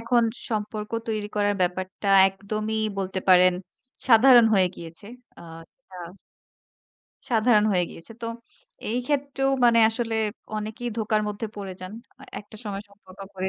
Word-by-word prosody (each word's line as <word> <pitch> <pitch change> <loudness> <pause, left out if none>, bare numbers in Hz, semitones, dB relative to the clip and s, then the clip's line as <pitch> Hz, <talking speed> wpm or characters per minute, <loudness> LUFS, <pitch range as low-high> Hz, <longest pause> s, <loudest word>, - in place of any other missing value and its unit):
এখন 235 +1 +2 0.3
সম্পর্ক 210 -1 -4 0.2
তৈরি 215 -2 -2
করার 205 0 +1
ব্যাপারটা 185 +2 -2 0.2
একদমই 215 +3 -4 0.2
বলতে 190 0 -3
পারেন 185 0 +6 0.6
সাধারণ 240 +1 +7
হয়ে 185 -2 +4
গিয়েছে। 165 +4 -10 0.3
আ - - -12 0.3
একটা 190 -9 -15 1.3
সাধারণ 220 -2 +3
হয়ে 180 -2 +2
গিয়েছে। 165 +7 -11
তো 230 - -3 0.6
এই 240 - 0
ক্ষেত্রেও 280 -2 -1
মানে 235 -1 +5
আসলে 225 0 -1 0.4
অনেকেই 220 +3 -5
ধোকার 215 -1 0
মধ্যে 210 +2 -4
পড়ে 195 -2 -6
যান। 185 +2 -8 0.5
একটা 210 +1 -14
সময় 200 -1 -5
সম্পর্ক 200 -2 -19 0.2
করে 190 0 -2
210 Hz, 135 wpm, -24 LUFS, 190-230 Hz, 1.3 s, সাধারণ